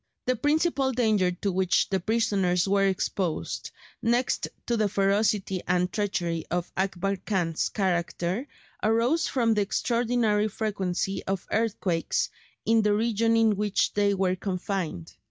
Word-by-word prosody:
The 255 - +2
principal 290 +1 +1
danger 215 -6 +2
to 180 +3 -2
which 185 -1 +2
the 190 - +1
prisoners 195 -4 +1
were 195 0 +3
exposed, 185 -2 -2 0.3
next 240 +2 +1 0.2
to 235 - 0
the 215 -2 +1
ferocity 195 -1 +1
and 180 0 +1
treachery 175 -6 -1
of 175 0 -2
Akbar 195 +1 -1
Khan's 180 -4 -1
character, 185 +4 -1 0.3
arose 230 +9 +2
from 235 -4 +2
the 210 - +1
extraordinary 230 0 +1
frequency 195 -3 -2
of 195 -1 -2
earthquakes 200 -6 0 0.3
in 225 0 +4
the 210 -1 +2
region 230 +1 +2
in 225 -2 +4
which 210 -1 +1
they 205 -1 +2
were 185 -1 +1
confined. 185 - -4
200 Hz, 135 wpm, -27 LUFS, 185-225 Hz, 0.3 s, in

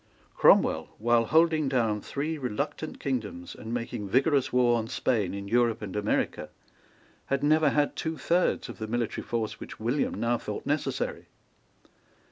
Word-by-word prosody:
Cromwell, - - +4
while 115 +1 +3
holding 160 0 +3
down 115 -5 +1
three 150 +8 -3
reluctant 140 +5 -4
kingdoms, 110 -10 -3
and 110 - -8
making 115 -3 -4
vigorous 135 +3 +2
war 120 -1 +3
on 110 - -4
Spain 105 -5 0
in 100 0 -6
Europe 115 0 +2
and 100 -2 -6
America, 105 +1 -1 0.8
had 140 +1 0
never 155 0 +4
had 145 +1 +1
two 160 0 -3
thirds 175 -3 +1
of 120 - -9
the 110 - -4
military 120 0 -2
force 115 -2 -3
which - - -9
William 120 +6 0
now 120 0 0
thought - - -6
necessary. - - -2
120 Hz, 150 wpm, -28 LUFS, 110-145 Hz, 0.8 s, Cromwell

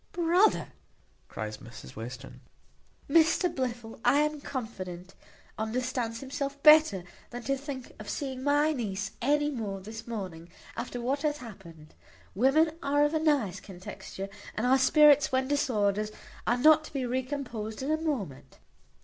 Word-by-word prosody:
"Brother," 350 +5 +3 0.6
cries 110 0 -5
Mrs 110 - -12
Western, 125 +4 -8 0.7
"Mr 330 +3 +4
Blifil, 240 -4 -4
I - - +4
am 300 -1 -1
confident, 185 -9 -6 0.5
understands 230 0 -2
himself 280 +1 -4
better 305 - +7 0.3
than 245 0 -7
to 275 +2 0
think 270 -2 -7
of 215 - -8
seeing 265 -3 -4
my 290 +2 +3
niece 200 -6 -3
any 295 +3 +2
more 210 -7 -4
this 220 +4 -9
morning, 185 -7 -6 0.3
after 245 - -4
what 265 +4 -1
hath 295 -1 0
happened. 185 - -12 0.4
Women 270 - +4
are 290 +1 +3
of 295 - -1
a 315 - +2
nice 290 - +1
contexture; 190 +1 -8 0.3
and 220 - -1
our 265 +2 +4
spirits, 290 +1 +6
when 260 0 +1
disordered, 215 -7 +1 0.4
are 240 - +3
not 310 +4 +6
to - - -12
be 270 -3 -1
recomposed 250 -3 -3
in 285 - -1
a 310 - +2
moment. 200 - -4
255 Hz, 145 wpm, -29 LUFS, 205-290 Hz, 0.7 s, better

